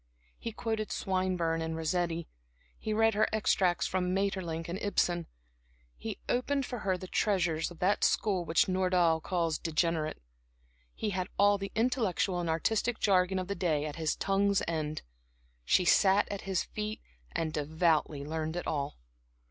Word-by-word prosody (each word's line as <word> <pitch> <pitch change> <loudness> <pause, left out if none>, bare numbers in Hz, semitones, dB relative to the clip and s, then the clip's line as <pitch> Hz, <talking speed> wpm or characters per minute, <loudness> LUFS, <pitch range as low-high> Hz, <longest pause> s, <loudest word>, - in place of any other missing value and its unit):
He 230 - -4
quoted 220 -1 -3
Swinburne 185 -3 0
and 160 0 -3
Rossetti; 170 0 -1 0.5
he 215 - -3
read 225 +1 +3
her 215 +1 +3
extracts 185 -7 +2
from 185 0 0
Maeterlinck 185 -5 -1
and 175 +4 -4
Ibsen; 175 -4 0 0.7
he - - -6
opened 270 +2 0
for 245 -2 -5
her 190 -2 0
the 185 - -8
treasures 175 -5 +1
of 175 - -12
that 190 +4 +1
school 195 -5 +2
which 165 0 +2
Nordau 180 -3 +2
calls 165 -2 -1
degenerate. 165 -1 0 0.8
He 210 - -2
had 185 -1 -2
all 205 0 +4
the 195 0 -5
intellectual 220 -6 +1
and 170 -1 -2
artistic 220 +8 0
jargon 190 -2 +3
of 185 -1 -2
the 200 - -1
day 165 -6 0
at 150 0 -5
his 160 -1 0
tongue's 200 0 +2
end. 155 -2 -2 0.6
She 180 - +3
sat 195 +3 +5
at 200 - -4
his 190 -3 +1
feet 215 0 -5 0.3
and 160 -1 -1
devoutly 155 -1 +1
learned 160 +1 -3
it 175 - -3
all. 145 -2 -2
180 Hz, 155 wpm, -31 LUFS, 165-200 Hz, 0.8 s, sat